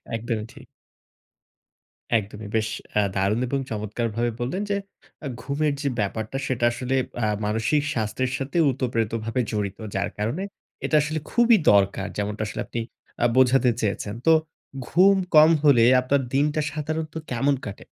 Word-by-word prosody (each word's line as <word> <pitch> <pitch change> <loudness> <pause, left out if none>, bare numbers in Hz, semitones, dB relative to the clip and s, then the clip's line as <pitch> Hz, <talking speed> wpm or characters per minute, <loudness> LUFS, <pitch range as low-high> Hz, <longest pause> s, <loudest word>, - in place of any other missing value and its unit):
একদমই 115 -1 -3
ঠিক। - - -14 1.5
একদমই! 105 +1 -9
বেশ 110 -1 +1 0.3
অ্যা 105 - +3
দারুন 100 +4 +1
এবং 135 +2 -1
চমৎকার 110 +2 -3
ভাবে 120 +1 0
বললেন, 130 +11 -2
যে, 200 - +1 0.4
অ্যা 145 - -4
ঘুমের 145 +2 0
যে, 145 - -1
ব্যাপারটা 110 +4 -2
সেটা 120 -2 0
আসলে, 125 +2 -2 0.3
আ - - +3 0.2
মানসিক 110 +8 +1
স্বাস্থ্যের 120 +3 -1
সাথে 135 +5 -4
উতপ্রেতভাবে 115 -2 -1
জড়িত। 100 -2 -2 0.2
যার 100 +1 0
কারণে 115 - -2 0.4
এটা - - +1
আসলে 155 +2 -2
খুবই 235 -1 +5
দরকার 100 -1 +2
যেমনটা 105 +1 -3
আসলে - - -4
আপনি 120 - -5 0.4
আ - - +5
বোঝাতে 130 0 +5
চেয়েছেন। 105 -1 -2
তো 165 - +8 0.6
ঘুম 190 +4 +5 0.2
কম 155 +1 +8
হলে, 135 -6 +6 0.2
আপনার 135 +2 +1
দিনটা 150 +3 +2
সাধারণত 155 +1 -4 0.2
কেমন 135 +4 +2
কাটে? 100 - -8
120 Hz, 145 wpm, -24 LUFS, 110-145 Hz, 1.5 s, তো